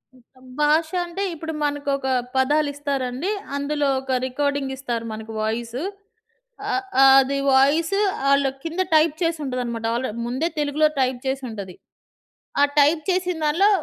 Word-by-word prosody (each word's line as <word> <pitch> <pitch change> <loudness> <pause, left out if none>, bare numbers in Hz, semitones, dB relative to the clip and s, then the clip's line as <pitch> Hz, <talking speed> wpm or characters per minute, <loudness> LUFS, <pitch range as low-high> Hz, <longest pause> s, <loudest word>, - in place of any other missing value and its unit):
మొత్తం 255 +1 -22 0.2
భాష 315 +2 +3 0.2
అంటే 345 +3 -4
ఇప్పుడు 320 0 -6
మనకొక 285 -2 -1 0.3
పదాలు 290 +3 +2
ఇస్తారండి. 280 +2 -2 0.3
అందులో 285 0 -1
ఒక 265 -1 -2
రికార్డింగ్ 280 0 -1
ఇస్తారు 240 -4 -4
మనకు 220 +1 -8
వాయిస్. 230 +2 -2 0.9
ఆ! - - 0 0.5
అది 275 +1 +1 0.2
వాయిస్ 310 +8 +3 0.3
ఆళ్ళు 280 -1 +4
కింద 335 +3 -2
టైప్ 310 0 +4
చేసి 330 -1 0
ఉంటదనమాట. 240 -3 -3
ఆల్రెడీ 235 -2 -3
ముందే 260 +7 -1
తెలుగులో 295 +1 +2
టైప్ 255 -1 0
చేసి 265 0 -2
ఉంటది. 200 -5 -7 0.9
ఆ - - +7 0.2
టైప్ 305 +3 +4
చేసిన 360 -2 -1
దాంట్లో 355 +8 +4
280 Hz, 135 wpm, -23 LUFS, 255-310 Hz, 0.9 s, ఆ